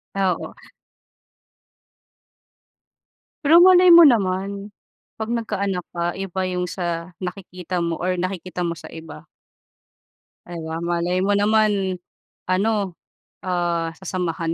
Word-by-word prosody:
Oo. 190 -2 -1 2.9
Pero 330 +4 +7
malay 365 0 +7
mo 340 -1 +10
naman 200 - +2 0.5
pag 220 +1 -5
nagka-anak 200 -5 -2
ka, 170 0 -1
iba 190 -1 -3
yung 180 0 -2
sa 170 -1 -4
nakikita 180 -1 -5
mo 170 -1 -1
or 180 0 -1
nakikita 185 0 -4
mo 170 - -3
sa - - -12
iba. 160 -1 -10 1.2
Di 175 - -8
ba, 160 +1 -4
malay 175 +1 -1
mo 195 +2 +1
naman 205 -3 +1 0.5
ano, 195 0 0 0.5
ah, 175 -2 -1
sasamahan 170 -3 -3
185 Hz, 105 wpm, -22 LUFS, 175-200 Hz, 2.9 s, mo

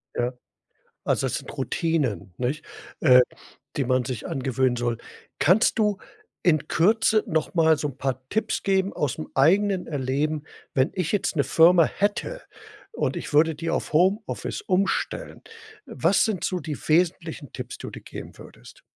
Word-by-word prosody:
Ja. 120 +1 -1 0.7
Also, - - +1
das - - -2
sind - - -6
Routinen, 145 - -1
nicht, 130 +5 -2 0.4
äh, 125 -4 +7 0.6
die 140 - +1
man 130 0 +1
sich 125 -3 -5
angewöhnen 130 -1 0
soll. 120 -1 -1 0.4
Kannst 195 +9 +4
du 210 -2 +2 0.4
in 155 -4 +2
Kürze 215 +4 +3
noch 160 -2 -1
mal 160 -2 +4
so 150 - -2
'n 130 - -9
paar 130 -1 -3
Tipps 220 - -1
geben 195 0 +1
ausm 150 +1 -2
eigenen 190 +7 +3
Erleben? 145 +2 -1 0.3
Wenn 130 0 +2
ich 180 -2 -1
jetzt 200 -5 0
'ne 140 - +3
Firma 165 +4 +6
hätte 210 - -2 0.5
und - - -1
ich - - -6
würde 160 +2 +4
die 165 +2 -4
auf - - -2
Homeoffice 190 +7 +1
umstellen. 195 - -1 0.4
Was - - +2
sind 215 -5 -2
so 185 - 0
die 150 -1 -5
wesentlichen 165 -2 0
Tipps, 125 -1 -7
die - - -7
du - - -9
geben - - -10
würdest? - - -14
160 Hz, 155 wpm, -25 LUFS, 135-190 Hz, 0.7 s, äh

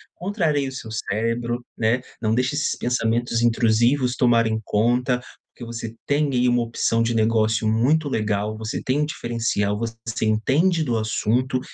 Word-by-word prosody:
Contraria 165 -8 -1
o - - -9
seu 110 -4 -8
cérebro, 115 +3 -2
né, 115 +3 +1 0.2
não 110 0 +1
deixa 125 +3 0
esses 150 - 0
pensamentos 120 -1 0
intrusivos 120 +3 +2
tomarem 115 -3 +2
conta, 125 +4 +1 0.4
porque 120 - -9
você 115 -1 -6
tem 145 0 +1
aí 125 0 +3
uma 120 -1 +2
opção 115 0 0
de 115 +1 0
negócio 110 -1 +2
muito 140 +8 +2
legal, 105 -1 -1
você 110 0 -4
tem 135 +3 +1
um - - +2
diferencial, 115 -6 -1
você 115 0 -4
entende 145 +11 +2
do 120 -5 0
assunto, 120 +4 0
115 Hz, 155 wpm, -23 LUFS, 110-130 Hz, 0.4 s, aí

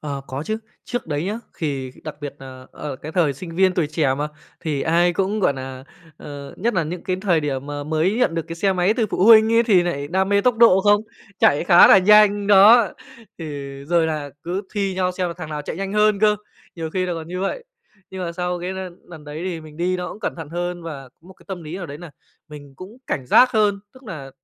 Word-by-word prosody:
Ờ, 140 -2 -5
có 135 +2 -5
chứ, 215 +6 -2 0.3
trước 245 -7 -4
đấy 150 +1 -2
nhá 210 +4 -3 0.2
thì 140 -5 -3
đặc 155 - -6
biệt 145 -1 -6
nà 130 -1 -11
ở 145 -3 -6
cái 155 +4 -9
thời 165 -6 +2
sinh 165 +4 -9
viên, 190 -1 +3
tuổi 170 -5 +1
trẻ 150 -3 0
mà, 145 +2 -3 0.3
thì 145 -4 -2
ai 170 +2 +2
cũng, 195 +4 -1
gọi 180 - +3
nà, 130 -1 -8 0.3
ờ, 140 -2 -9
nhất 230 +3 -1
nà 170 - +2
những 170 +3 -6
cái 185 - -1
thời 175 -6 +2
điểm 140 -2 -3
mà 145 0 -5
mới 160 +6 0
nhận 180 -9 +2
được 165 - -1
cái 165 - -6
xe 195 +3 +1
máy 185 +3 +2
từ 230 -3 0
phụ 185 - +1
huynh 220 0 +7
ấy, 230 +1 +5
thì 200 -6 +4
nại 145 -5 -3
đam 190 +3 0
mê 200 0 +3
tốc 245 +2 +2
độ 220 -5 +6
không? 205 +1 +4 0.4
Chạy 145 - +3
khá 175 -1 +8
là - - +8
nhanh 205 +1 +5
đó, 205 +3 +7 0.5
thì 165 - -6 0.4
rồi 165 +1 +2
là 150 -3 -3
cứ 185 +4 -3
thi 195 -2 -1
nhau 185 -1 0
xem 180 -1 -2
là 170 - -6
thằng 160 -3 -8
nào 150 -1 -4
chạy - - -6
nhanh 195 +1 -4
hơn 210 -1 +3
cơ, 210 -1 +4 0.4
nhiều 160 -1 -4
khi 185 +2 -1
là 175 - -2
còn 160 -1 -7
như 180 +1 -4
vậy. 460 - -3 0.5
Nhưng 190 -1 -6
mà 170 - -4
sau 180 0 -3
cái 180 +2 -4
l 190 - -6 0.3
lần 160 -4 -12
đấy 150 +2 -7
thì 175 -3 -4
mình 155 -1 -13
đi 180 +2 0
nó 180 0 -4
cũng 210 - -10
cẩn 205 - -3
thận 160 -3 -8
hơn 175 +1 -4
và 140 -5 -8
có - - -40
một 190 - -14
cái - - -22
tâm 185 -3 -6
lý 155 +3 -7
nào 180 -3 -6
đấy 145 0 -9
nà 175 -2 -10 0.4
mình 145 -2 -12
cũng 190 - -11
cảnh 130 - -3
giác 250 - +6
hơn, 210 -3 +2
tức 260 - -17
nà 155 - -8
175 Hz, 255 wpm, -21 LUFS, 150-195 Hz, 0.5 s, khá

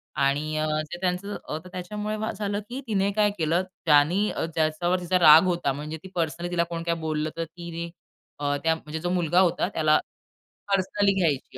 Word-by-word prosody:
आणि 145 +3 0
अ, 155 - 0 0.3
ते - - -4
त्यांचं 185 +3 -1
अ, 155 - -3
तर - - -10
त्याच्यामुळे 210 +4 -4 0.2
झालं 205 0 -2
की, 255 +3 -5
तिने 200 -2 +1
काय 210 -1 +3
केलं, 165 +3 +1 0.2
ज्यानी 160 +7 +4
अ, - - -2
ज्याच्यावर 165 +3 +1
तिचा 180 +1 +1
राग 160 0 +9
होता. 175 -6 0
म्हणजे 150 +3 -6
ती - - -8
पर्सनली 170 +1 -2
तिला 170 -1 +2
कोण 165 -1 -4
काय 170 0 0
बोललं, 155 0 -1
तर 165 - -1
तिने 170 0 -7 0.5
अ, 145 0 0
त्या 160 0 +3
म्हणजे 160 0 -7
जो 175 +2 -2
मुलगा 175 -1 +2
होता 180 -1 +2
त्याला 155 -1 +3 0.7
पर्सनली 195 +1 +2
घ्यायची 145 -7 0
170 Hz, 185 wpm, -26 LUFS, 155-185 Hz, 0.7 s, राग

